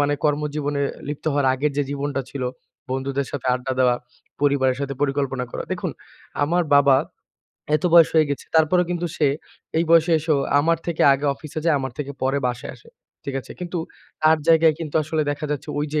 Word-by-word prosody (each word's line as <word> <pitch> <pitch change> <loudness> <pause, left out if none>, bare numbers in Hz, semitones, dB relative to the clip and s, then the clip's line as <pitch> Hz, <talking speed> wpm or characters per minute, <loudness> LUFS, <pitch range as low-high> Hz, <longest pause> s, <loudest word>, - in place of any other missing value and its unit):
মানে 145 0 +2
কর্মজীবনে 145 -1 0 0.3
লিপ্ত 145 -1 -5
হওয়ার 140 -2 +1
আগের 145 +3 0
যে 145 - +2
জীবনটা 140 0 -2
ছিল 140 - -5 0.5
বন্ধুদের 135 +1 -2
সাথে 135 -3 -5
আড্ডা 130 +1 -3
দেওয়া, 125 -1 +4 0.5
পরিবারের 135 -3 +2
সাথে 140 -1 -3
পরিকল্পনা 135 -2 -1
করা। - - -4
দেখুন, - - -3 0.5
আমার 170 +4 +2
বাবা 140 -2 +6 0.8
এত 165 - -9
বয়স 170 -2 +8
হয়ে 155 -2 +4
গেছে। 140 - -4
তারপরেও 170 +3 +4
কিন্তু 175 0 -1
সে 150 - +2 0.5
এই 165 - +2
বয়সে 165 0 +5
এসো 155 0 0 0.3
আমার 165 +2 +2
থেকে 170 -2 0
আগে 140 +2 -1
অফিসে 155 +2 -8
যায়, 165 -2 +3
আমার 130 -2 -4
থেকে 140 -1 -4
পরে 135 +2 +1
বাসায় 125 0 -4
আসে। 120 - -20 0.4
ঠিক 140 - -4
আছে? - - -11
কিন্তু 180 0 -3 0.4
তার 155 +1 +6
জায়গায় 160 -1 +5
কিন্তু 160 -3 -6
আসলে 155 +1 -1
দেখা 145 +1 -3
যাচ্ছে 150 +1 -4
ওইযে 150 +1 -1
145 Hz, 185 wpm, -22 LUFS, 140-160 Hz, 0.8 s, বয়স